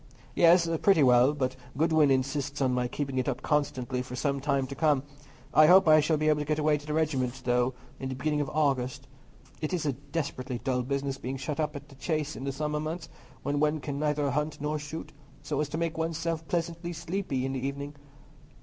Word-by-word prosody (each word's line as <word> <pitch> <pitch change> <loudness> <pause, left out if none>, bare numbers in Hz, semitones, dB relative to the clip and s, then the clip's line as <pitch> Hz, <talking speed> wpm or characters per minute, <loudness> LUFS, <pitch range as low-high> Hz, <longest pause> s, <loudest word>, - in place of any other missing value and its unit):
"Yes, 170 0 +5
pretty 195 -7 +5
well; 125 +1 +6
but 130 -2 -1 0.2
Godwin 160 -1 +4
insists 140 +2 0
on 130 -2 +2
my 125 0 +1
keeping 135 0 -3
it 130 - 0
up 130 - -4
constantly 130 -4 0
for 125 0 -7
some 140 +1 0
time 140 -1 0
to 130 - -7
come. 145 -2 +2 0.5
I 155 0 +7
hope 185 +1 +7
I 155 0 +8
shall 155 +1 +2
be 155 +1 0
able 150 -1 +3
to 150 - -2
get 155 +1 0
away 150 -1 +2
to 145 - -14
the 150 - -2
regiment, 135 -5 0
though, 125 +1 +2 0.2
in 130 - -4
the 130 - -3
beginning 150 +3 0
of 140 - -2
August. 135 -4 0 0.6
It's 160 +1 -1
a 145 - +1
desperately 140 -2 -4
dull 125 0 -1
business 135 +1 -2
being 130 +2 -4
shut 140 +3 -4
up 150 -1 -1
at 145 0 -8
the - - -14
Chase 150 +2 -2
in 135 - -6
the 140 - -1
summer 150 +2 -2
months, 160 +3 -4 0.3
when 145 0 0
one 150 +1 +2
can 140 0 -4
neither 150 -2 +1
hunt 150 +2 -2
nor 150 +1 -1
shoot, 150 +2 -7 0.3
so 150 -1 -1
as 150 - -2
to 155 - -3
make 165 -1 -2
one's 165 0 -1
self 165 -1 -3
pleasantly 170 0 -2
sleepy 160 -6 -2
in 135 - -2
the 130 -1 -3
evening. 140 +1 -4
145 Hz, 220 wpm, -29 LUFS, 135-155 Hz, 0.6 s, I